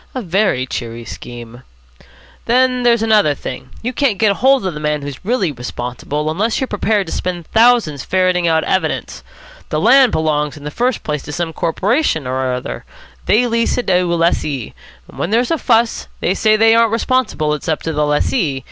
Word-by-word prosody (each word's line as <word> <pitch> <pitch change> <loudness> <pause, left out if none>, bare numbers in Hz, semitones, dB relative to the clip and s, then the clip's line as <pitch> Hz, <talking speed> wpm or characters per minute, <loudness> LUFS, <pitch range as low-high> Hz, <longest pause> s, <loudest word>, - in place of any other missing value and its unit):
"A 255 - -2
very 180 -8 +1
cheery 115 -2 -6
scheme." 120 0 -9 0.9
"Then 250 +1 +2
there's 235 -2 +3
another 210 -9 +3
thing. 130 -1 -7
You 250 +2 -2
can't 255 -6 +1
get 210 -3 +2
hold 265 -3 +3
of 185 - -2
the 150 - -6
man 150 -1 -1
who's 140 -2 -7
really 205 -5 0
responsible, 125 +4 -4
unless 215 +8 0
you're 265 - -1
prepared 205 -1 0
to 160 - -6
spend 175 -2 -3
thousands 225 - +3
ferreting 185 -2 +1
out 160 -1 +2
evidence. 190 - -2 0.5
The - - -1
land 265 -3 +5
belongs 150 -1 -1
in 145 - -12
the 150 - -5
first 245 +5 -1
place 150 -2 -3
to 145 - -9
some 165 +1 -3
corporation 185 - 0
or 130 0 -1
other. 125 0 -5 0.4
They 225 +5 +4
lease 230 -1 0
it 245 - -1
to 180 -1 +3
a 175 -1 0
lessee. 150 -7 -1 0.3
When - - -5
there's 235 +6 +1
a 325 - +1
fuss, 230 -2 +1
they 180 - 0
say 215 +2 +3
they 225 +1 +5
aren't 230 -1 +4
responsible, 230 -11 0
it's 150 +3 -5
up 155 - -1
to 160 - -2
the 150 0 0
lessee. 150 - 0
180 Hz, 190 wpm, -17 LUFS, 150-230 Hz, 0.9 s, land